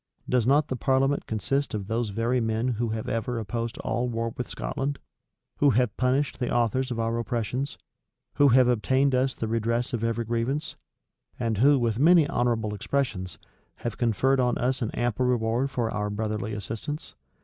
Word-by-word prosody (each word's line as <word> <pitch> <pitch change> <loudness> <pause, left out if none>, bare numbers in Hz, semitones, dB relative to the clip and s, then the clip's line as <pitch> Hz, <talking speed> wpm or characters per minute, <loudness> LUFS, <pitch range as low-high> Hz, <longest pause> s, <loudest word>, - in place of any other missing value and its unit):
Does 125 -2 +2
not 145 +3 +4
the 130 - -1
parliament 135 +2 +1
consist 110 +6 -1
of 100 -2 -3
those 115 +2 -1
very 115 +4 0
men 110 +2 0
who 120 -1 -1
have 110 0 -3
ever 115 +2 -2
opposed 115 +3 -3
all 125 0 -1
war 115 -1 -2
with 125 - -4
Scotland, 140 +1 -3 0.6
who 145 - +4
have 120 -3 +2
punished 130 +3 0
the 125 - -1
authors 120 +3 +1
of 120 -2 -3
our 115 +1 0
oppressions, 125 +4 -2 0.6
who 145 0 +5
have 130 -1 +6
obtained 130 +3 +2
us 130 +1 +1
the 115 - -3
redress 115 +3 -1
of 115 -1 -2
every 115 0 0
grievance, 120 +6 -2 0.6
and 115 -4 -1
who, 140 +4 +6
with 115 -2 0
many 165 +2 +6
honorable 115 -5 0
expressions, 100 -5 -2 0.4
have 120 -2 -5
conferred 130 +3 +2
on 125 -1 +2
us 130 +2 0
an 115 - 0
ample 120 +1 0
reward 120 +2 +1
for 120 -4 -1
our 105 0 -2
brotherly 105 0 -3
assistance? 115 +9 -5
120 Hz, 175 wpm, -26 LUFS, 115-130 Hz, 0.6 s, have